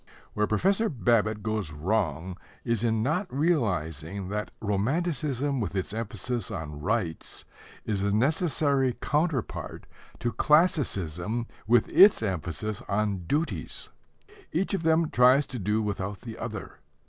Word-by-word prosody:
Where 105 0 +1
Professor 195 - +2
Babbitt 110 -6 +1
goes 110 -7 -2
wrong 85 +1 -1 0.3
is 115 -2 0
in 110 -2 +1
not 180 - -1
realizing 95 - -1
that 105 +1 -3
romanticism 140 - 0
with 100 -4 -3
its 95 +1 -2
emphasis 115 +2 -3
on 75 -7 -6
rights 80 +2 -2 0.4
is 100 -3 -1
a 100 - +1
necessary 140 - +2
counterpart 150 -5 -1 0.3
to 120 - -1
classicism 115 - +1 0.2
with 120 +2 +4
its 195 - +7
emphasis 95 +2 -3
on 100 -3 0
duties. 140 - -2 0.6
Each 180 +6 0
of 195 - 0
them 160 0 +2
tries 130 +3 +5
to 125 -1 -6
do 105 +3 0
without 100 -1 -3
the 115 -2 -7
other. - - -6
110 Hz, 125 wpm, -27 LUFS, 100-145 Hz, 0.6 s, its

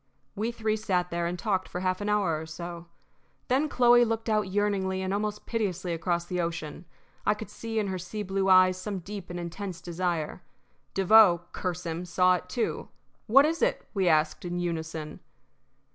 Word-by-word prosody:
We 220 +3 -1
three 220 -2 -1
sat 180 -4 -1
there 170 0 -1
and 175 +1 -3
talked 190 -3 -1
for 180 - -4
half 185 +1 0
an 205 - -2
hour 190 -7 +1
or 160 - -8
so. 170 +1 -7 0.6
Then 275 +5 +2
Chloe 240 -2 +6
looked 225 0 -1
out 215 -2 +2
yearningly 195 -1 0
and 190 +1 -1
almost 210 +1 -2
piteously 185 -6 -2
across 170 +1 -1
the 180 0 -2
ocean. 165 -1 -4 0.4
I 210 - +2
could 210 -1 -9
see 225 0 -5
in 215 - +2
her 190 -2 -3
sea 210 +4 -5
blue 195 0 0
eyes 185 0 +6
some 200 +1 -4
deep 200 +1 -8
and 175 0 -5
intense 175 +1 -5
desire. 175 -2 -3 0.5
Devoe, 195 -3 +6
curse 180 -1 -4
him! 165 +2 -3
saw 180 +1 +3
it 180 - -12
too. 235 +4 -2 0.4
"What 270 +6 +7
is 325 +2 -1
it?" - - 0
we 195 -4 +1
asked, 155 -1 +2
in 175 0 -3
unison. 160 -3 -4
185 Hz, 185 wpm, -28 LUFS, 175-210 Hz, 0.6 s, What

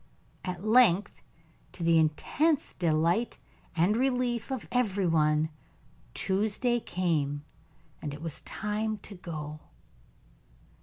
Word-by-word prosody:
At 180 -1 -4
length, 215 -4 +4 0.5
to 175 - -5
the 165 -1 +5
intense 275 - +1
delight 170 +6 +1 0.4
and 175 +5 +3
the 225 - 0
relief 250 -2 0
of 260 -3 -3
every 205 -6 +1
one, 155 -2 +3 0.7
Tuesday 215 +5 +1
came, 150 -8 -1 0.6
and 150 - -4
it 145 +1 -8
was 165 -3 -2
time 215 +1 -2
to 205 - -6
go. 155 -5 -6
185 Hz, 110 wpm, -29 LUFS, 160-220 Hz, 0.7 s, the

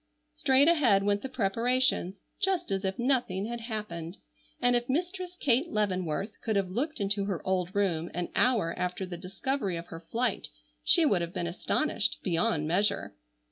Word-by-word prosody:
Straight 265 +2 +4
ahead 255 -13 +4
went 205 0 +1
the 265 - -5
preparations, 230 -3 +1 0.2
just 385 - 0
as 195 0 0
if 190 +2 -1
nothing 240 -7 +1
had 235 +1 -4
happened, 210 -6 -5 0.4
and 245 0 +3
if 240 +1 0
Mistress 360 +4 -2
Kate 275 +5 +2
Leavenworth 190 - -1
could 220 -2 -1
have 195 -2 0
looked 290 - -2
into 200 0 0
her 195 -4 -2
old 185 0 -1
room 175 -5 +1
an 175 0 -2
hour 225 -10 +3
after 180 +1 -2
the 180 -1 -6
discovery 195 +3 -2
of 165 - -6
her 165 - -7
flight 235 +9 -1 0.4
she 335 -3 +5
would 200 - +3
have 170 +1 -4
been 175 - -1
astonished 205 - 0
beyond 170 -3 +1
measure. 200 +5 +1
205 Hz, 170 wpm, -29 LUFS, 185-255 Hz, 0.4 s, she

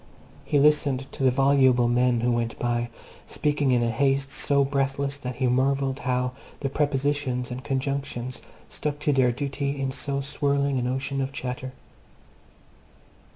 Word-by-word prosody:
He 145 - +1
listened 140 -2 +3
to - - -8
the 130 - +5
voluble 130 -2 +4
men 120 0 +2
who 120 +1 +2
went 120 -1 -1
by, 120 0 -1 0.4
speaking 145 -2 0
in 120 -1 +3
a 115 - +1
haste 135 +3 +1
so 140 0 +2
breathless 140 0 -1
that 125 -2 -5
he 130 - -1
marvelled 135 +2 +1
how 125 0 0 0.3
the 135 -2 -2
prepositions 140 -3 0
and 125 +1 -5
conjunctions 135 -2 -3 0.3
stuck 145 -1 -3
to 150 - +2
their 130 -2 +4
duty 140 +2 -3
in 135 -1 -1
so 140 +1 -2
swirling 140 0 0
an 125 - -1
ocean 135 +2 -1
of 135 0 -2
chatter. 130 -1 -5
135 Hz, 155 wpm, -25 LUFS, 125-140 Hz, 0.4 s, the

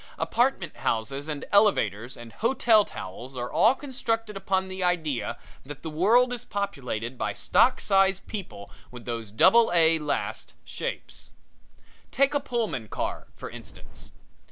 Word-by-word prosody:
Apartment - - 0
houses 135 +6 -2
and 150 -2 -4
elevators 125 - +2
and 120 -1 -11
hotel 230 -2 +3
towels 125 - -9
are 120 0 -4
all 230 +5 +4
constructed 225 -6 -3
upon 190 -1 -1
the 190 0 -4
idea 160 -7 -1 0.3
that 145 +1 -10
the 160 - -5
world 230 +10 +4
is 240 - -5
populated 130 - -4
by - - -1
stock - - +3
size 195 -1 +3
people 180 - -8 0.2
with 125 -2 -11
those 115 -3 -4
double 225 - +5
A 165 -1 +5
last 150 -1 -3
shapes. - - -6 0.8
Take 275 +2 +2
a 290 - +2
Pullman 225 - -3
car, - - -4
for - - -8
instance. - - -11
180 Hz, 140 wpm, -26 LUFS, -, 0.8 s, double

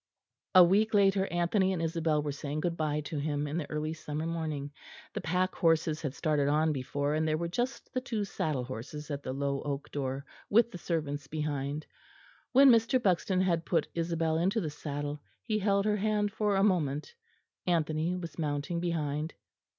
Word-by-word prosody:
A 185 - +11
week 210 +5 +3
later 195 -1 +4
Anthony 185 +3 +1
and 180 - -2
Isabel 160 -2 +1
were 145 - -2
saying 145 +2 -4
good 170 0 0
bye 150 -2 0
to 150 0 -4
him 145 0 -1
in 150 +3 -3
the 150 - -5
early 155 +1 -2
summer 155 0 -4
morning: 155 -4 -3 0.4
the - - -3
pack 180 +3 0
horses 160 -2 +2
had 145 -2 -3
started 150 -4 +1
on 155 +2 +3
before, 145 +2 -1
and 155 +1 +1
there 155 0 +1
were 170 +1 -2
just 245 +12 -3
the 255 - 0
two 225 -5 -2
saddle 155 -8 -2
horses 130 +5 -7
at 140 0 -3
the 130 - -4
low 140 +1 -1
oak 145 0 -4
door, 135 0 -3 0.2
with 235 +3 +4
the 180 - -7
servants' 145 -5 -2
behind. 150 -1 -3 0.7
When 270 +1 +8
Mr. 230 +2 +4
Buxton 185 -3 +2
had 170 -3 +1
put 165 -2 0
Isabel 165 -1 0
into 190 +6 +2
the 160 -7 -2
saddle, 145 0 -4 0.2
he 215 -2 0
held 200 0 +2
her 210 -1 +2
hand 210 0 +1
for 210 -1 +1
a 195 - +3
moment; 155 - +1 0.5
Anthony 160 0 +1
was 170 -2 -7
mounting 150 +2 -1
behind. 155 -2 -2
160 Hz, 185 wpm, -30 LUFS, 145-185 Hz, 0.7 s, A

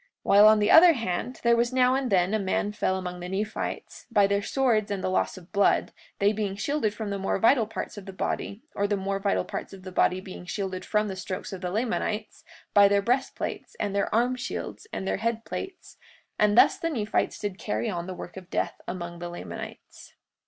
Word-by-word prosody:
43:38 - - -35 0.2
While 205 +2 +7
on 215 0 +7
the 210 0 +2
other 335 +1 +9
hand, 230 - -3
there 235 0 +5
was 235 +1 +1
now 255 0 +4
and 265 -3 -1
then 185 +1 +3
a 220 - +2
man 200 +1 0
fell 190 -2 0
among 180 -1 -5
the 180 0 -6
Nephites, 205 +3 -4
by 205 -4 +4
their 200 0 +1
swords 225 -2 +1
and 200 -2 -3
the 185 - 0
loss 190 - 0
of 180 -1 -14
blood, 200 -1 +2 0.2
they 200 +1 +3
being 205 -2 -2
shielded 250 +1 0
from 210 -1 -4
the 200 - -2
more 195 - 0
vital 225 +2 +4
parts 215 - -5
of 200 - -13
the - - -5
body, 200 +3 -3
or 200 - 0
the 205 0 0
more 195 0 -2
vital 195 0 0
parts - - -6
of 190 -1 -11
the 185 - -7
body 185 0 +2
being 185 -1 -10
shielded 190 -1 -3
from 210 0 +1
the 190 - -4
strokes 185 +1 -5
of 185 - -6
the 180 - -2
Lamanites, 215 0 -2 0.3
by 200 -1 +7
their 200 0 +2
breastplates, 255 - -2
and 200 - -1
their 200 - 0
arm 245 +3 +2
shields, 250 - -6
and 190 - -4
their - - 0
head 230 0 -2
plates; 380 -1 -7 0.4
and 210 +1 +3
thus - - +6
the 330 - -1
Nephites 220 -9 -1
did 205 -2 -4
carry 220 +2 -2
on 175 -4 -3
the 185 - -5
work 180 - -9
of 180 -1 -10
death - - -2
among 175 -1 -5
the 175 0 -5
Lamanites. 175 - -9
205 Hz, 225 wpm, -27 LUFS, 190-230 Hz, 0.4 s, other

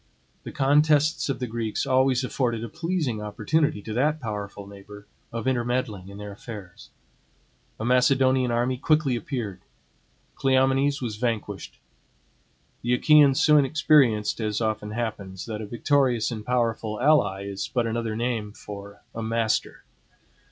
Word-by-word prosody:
The - - -8
contests 150 +2 +3
of 135 - -1
the 125 - -3
Greeks 115 -2 -3
always 130 0 +2
afforded 120 -3 -1
a 115 - -5
pleasing 160 - -2
opportunity 105 +3 0
to 110 - -5
that 150 +6 +1
powerful 105 -4 -6
neighbor 100 +1 -12 0.3
of 115 -1 -4
intermeddling 120 -6 -1
in 100 - -10
their 105 0 -7
affairs. 100 -3 -10 0.9
A 110 - -3
Macedonian 130 +1 +3
army 120 +2 0
quickly 150 -3 +2
appeared. 110 -6 -4 0.7
Cleomenes 135 +1 +2
was 110 -3 -4
vanquished. 115 -2 -3 1.0
The 120 +1 +1
Achaeans 145 0 +5
soon 150 -2 +5
experienced, 135 -8 +3
as 105 -1 -1
often 110 -2 -2
happens, 105 -4 -4
that 110 -2 -5
a 105 - -6
victorious 125 0 +1
and 110 -2 -5
powerful 115 -2 -1
ally 125 -9 +3
is 100 0 -4
but 120 -2 -1
another 115 -1 -2
name 115 -3 -2
for 100 -1 -10
a 115 - -5
master. 115 0 -1
120 Hz, 135 wpm, -25 LUFS, 105-130 Hz, 1.0 s, Achaeans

